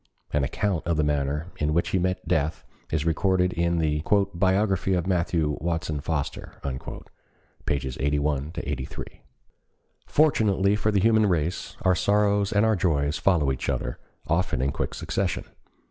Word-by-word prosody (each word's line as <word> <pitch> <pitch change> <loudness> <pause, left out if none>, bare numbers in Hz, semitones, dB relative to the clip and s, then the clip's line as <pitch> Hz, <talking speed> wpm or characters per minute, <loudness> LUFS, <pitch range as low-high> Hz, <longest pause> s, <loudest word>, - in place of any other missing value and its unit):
An 75 -1 +2
account 85 +5 -1
of 85 -2 +1
the 75 - +2
manner 75 +3 -1
in 75 +1 0
which 85 - +1
he 95 - +1
met 90 +1 -1
death 80 -2 0 0.2
is 80 0 -1
recorded 90 +2 +2
in 85 0 +1
the 75 -2 +1 0.3
"Biography 95 +1 +2
of 90 -1 0
Matthew 85 -5 0
Watson 80 -2 -2
Foster," 75 -1 -3
pp. 65 0 -6
81 75 +1 0
83. 65 -2 -4 1.0
Fortunately 105 -10 +3
for 105 +1 0
the 100 -3 +2
human 110 0 +4
race, 85 -2 -1
our 95 - +4
sorrows 100 +3 +2
and 105 0 +3
our 110 -1 +3
joys 75 -5 +1
follow 80 -8 +3
each 65 - -3
other, - - -2 0.3
often 85 -2 0
in 70 +2 +1
quick - - -3
succession. 95 -5 -2
85 Hz, 145 wpm, -26 LUFS, 75-95 Hz, 1.0 s, human